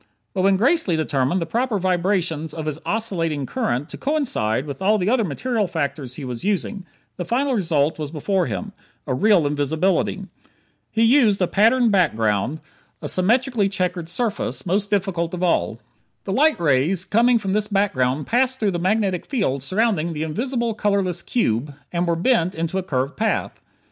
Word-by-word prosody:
But 190 - 0
when 195 0 +4
Gracely 245 - +2
determined 150 +1 0
the - - -4
proper 235 +5 -1
vibrations 175 -4 0
of 160 -2 -5
his 155 0 -3
oscillating 165 -10 -1
current 145 - -2
to - - -9
coincide 235 - 0
with 145 +4 -7
all 210 +3 +3
the 195 +2 0
other 250 -3 +3
material 210 - -1
factors 140 -6 -3
he 145 - -6
was 125 +1 -5
using, 200 0 -1 0.3
the 180 - -3
final 260 +9 0
result 160 - +1
was 150 -2 -3
before 175 +4 -1
him 210 -3 -4 0.3
real 170 +6 +3
invisibility. 150 +6 0 0.6
He 225 - +1
used 230 -4 +4
a 185 - +3
patterned 225 +5 +3
background 125 - +1 0.4
a - - -5
symmetrically 225 +2 +2
checkered 180 -3 -2
surface, 220 +1 -2
most 200 +3 0
difficult 185 -4 -1
of 180 - -4
all. 175 - +1 0.4
The 195 - -3
light 305 - +3
rays 165 +4 +2
coming 235 +3 +3
from 195 -4 -2
this 210 0 +1
background 150 -10 0
passed 260 +2 +1
through 210 -3 +1
the 175 - -2
magnetic 190 -1 0
field 195 - -1
surrounding 185 - 0
the 155 0 -3
invisible 235 - -2
colorless 200 -4 0
cube, 140 - -1 0.2
and 175 0 -1
were 170 - +2
bent 180 -1 +1
into 165 +3 -2
a - - -4
curved 135 -4 -2
path. 220 +1 -1
185 Hz, 170 wpm, -22 LUFS, 155-220 Hz, 0.6 s, when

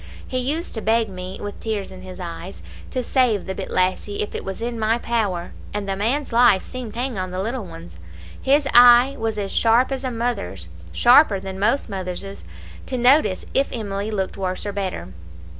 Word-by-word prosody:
He 255 - -1
used 295 +7 -2
to 220 - -2
beg 225 0 +2
me, 185 0 -7
with 205 0 -6
tears 215 -3 -3
in 185 -1 -10
his 185 0 -10
eyes, 175 +1 -7 0.3
to 255 - -2
save 240 -6 +2
the 190 - -3
bit 190 0 -6
lassie, 185 +3 0
if 210 - -7
it - - -4
was 195 - -5
in 235 0 -3
my 220 +1 +2
power, 210 -8 -1 0.2
and 205 -1 -3
the 195 - -1
man's 240 +7 -1
life 235 -5 +5
seemed 250 -4 -7
to - - -4
hang 250 -5 -2
on 185 0 -3
the 185 +1 -4
little 230 +3 -3
one's. 85 - -11 0.4
His 280 +1 +3
eye 245 +2 +8
was 225 -1 -2
as 200 -2 -3
sharp 235 +4 +3
as 270 0 -3
a 260 - -1
mothers' 225 - -3 0.2
sharper 240 - +5
than 190 0 -7
most 230 +7 +1
mothers' 195 -1 -6 0.4
to 255 - -2
notice 245 -6 +3
if 275 - +1
Emily 205 -2 -3
looked 195 -3 -3
worse 185 0 -3
or 205 - -3
better. 190 - -4
210 Hz, 200 wpm, -22 LUFS, 190-245 Hz, 0.4 s, eye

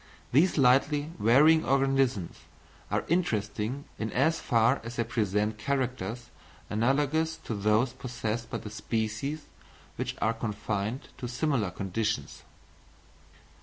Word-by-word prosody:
These 160 +9 +4
slightly 145 +3 +3
varying 145 +9 +6
organisms 135 -8 +1 0.5
are - - 0
interesting 130 - -1
in 110 0 -2
as 160 +5 +2
far 115 +2 +2
as 115 +1 -7
they 115 - +1
present 105 -1 -1
characters 125 -3 -2 0.4
analogous 145 +8 +1
to - - -4
those 105 +4 +2
possessed 120 -2 -4
by - - -3
the 105 - -8
species 115 +8 -3 0.5
which - - -3
are 110 - +2
confined 110 +2 -3
to 125 - -4
similar 125 - 0
conditions. 105 +4 -3
120 Hz, 115 wpm, -29 LUFS, 110-140 Hz, 0.5 s, varying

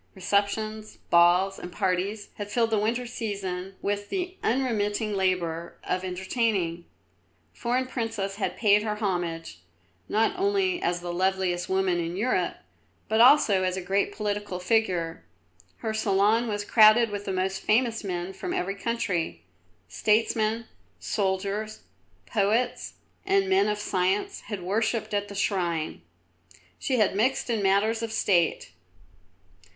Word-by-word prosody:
Receptions, 210 +3 -1
balls, 180 +3 +4
and 180 - -8
parties 195 +2 -1
had 205 0 -4
filled 225 +1 +1
the 215 - +2
winter 235 +4 0
season 195 -5 -4
with 205 0 -2
the 370 -1 -3
unremitting 220 -4 0
labour 175 -3 -1
of 185 +1 -2
entertaining. 185 -2 -1 0.7
Foreign 250 +2 -1
princes 225 -6 -3
had 205 - -2
paid 210 -2 +4
her 210 -1 -2
homage, 175 - -3 0.5
not 225 - +2
only 385 -2 +1
as 175 0 -1
the 175 0 -4
loveliest 185 -1 0
woman 190 -2 +1
in 170 +1 -3
Europe, 245 +5 0 0.5
but 220 +1 +3
also 240 -7 +6
as 185 0 0
a - - -3
great 195 +2 0
political 205 -3 -3
figure. 180 - 0 0.5
Her 220 - -3
salon 215 +2 +2
was 205 -1 -2
crowded 220 +1 +6
with 205 0 -5
the 195 - -2
most 190 +1 -1
famous 225 +1 +1
men 180 -1 -4
from 360 - -5
every 190 +2 -1
country. 195 - -2 0.4
Statesmen, 220 - +1 0.3
soldiers, 200 +2 -2 0.4
poets, 215 - 0 0.3
and 390 0 +2
men 385 +1 +3
of 210 0 0
science 190 -1 -1
had 205 -5 -5
worshipped 220 +4 -1
at 205 0 0
the 200 - -9
shrine. 175 - -1 0.8
She 265 - 0
had 210 -4 +2
mixed 245 +3 +1
in 225 -3 0
matters 200 +4 +2
of 230 -1 -3
State. 180 - +1
205 Hz, 135 wpm, -26 LUFS, 185-225 Hz, 0.8 s, also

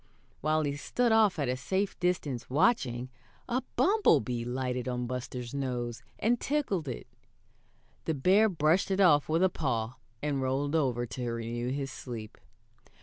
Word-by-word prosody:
While 155 +1 +1
he 145 -1 -2
stood 235 +11 0
off 220 -4 +4
at 145 -3 0
a 125 - 0
safe 190 +10 -2
distance 165 -8 -1
watching, 130 - +1 0.4
a 250 +1 0
bumblebee 125 - +3
lighted 125 0 -2
on 125 -1 -2
Buster's 125 0 -5
nose 125 -4 -3 0.2
and 235 +2 +2
tickled 255 - -1
it. 125 - -5 1.0
The 160 - 0
bear 195 +10 +4
brushed 165 +1 +2
it 190 0 0
off 155 -7 +5
with 165 +3 +3
a - - +7
paw, 125 -7 -2 0.3
and 145 -2 0
rolled 135 +3 0
over 125 -6 +1
to 120 0 -4
renew 115 +1 -3
his 135 0 -3
sleep. 115 -5 -8
140 Hz, 150 wpm, -30 LUFS, 125-180 Hz, 1.0 s, a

